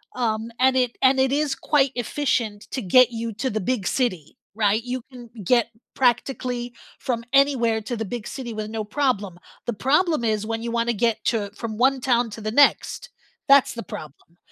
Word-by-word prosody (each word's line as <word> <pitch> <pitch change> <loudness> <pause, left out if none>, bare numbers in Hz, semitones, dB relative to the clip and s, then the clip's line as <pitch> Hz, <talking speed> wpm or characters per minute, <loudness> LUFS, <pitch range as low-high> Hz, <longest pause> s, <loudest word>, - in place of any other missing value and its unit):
um, 225 -2 -1
and 260 0 +4
it 250 -2 0
and 265 0 +4
it 265 0 +3
is 290 0 0
quite 280 -3 +2
efficient 230 -4 -2
t 260 - -3
to 190 - -8
get 255 +5 +6
you 230 0 -4
to 260 +6 -2
the 215 - -2
big 205 -1 -1
city, 185 - -2 0.2
right, 215 0 +2
you 250 +1 -4
can 240 -2 -11
get 235 +4 +3 0.3
practically 245 -1 0 0.3
from 235 -3 -2
anywhere 260 -5 +3
to 240 +3 -4
the 225 - -2
big 225 +1 -6
city 245 -4 -6
with 215 0 -5
no 220 -1 -3
problem. 210 -6 -1 0.3
The 240 - -2
problem 300 - +1
is 215 -1 0
when 225 0 -3
you 235 - -4
wanna 235 0 +1
get 230 +1 0
to 205 -4 0
from 220 -2 -5
one 265 +2 +3
town 240 -2 +2
to 220 - -8
the 215 0 -3
next, 290 - +3 0.4
that's 275 -1 +5
the 230 - -6
problem. 160 +1 -11
235 Hz, 195 wpm, -23 LUFS, 215-260 Hz, 0.4 s, get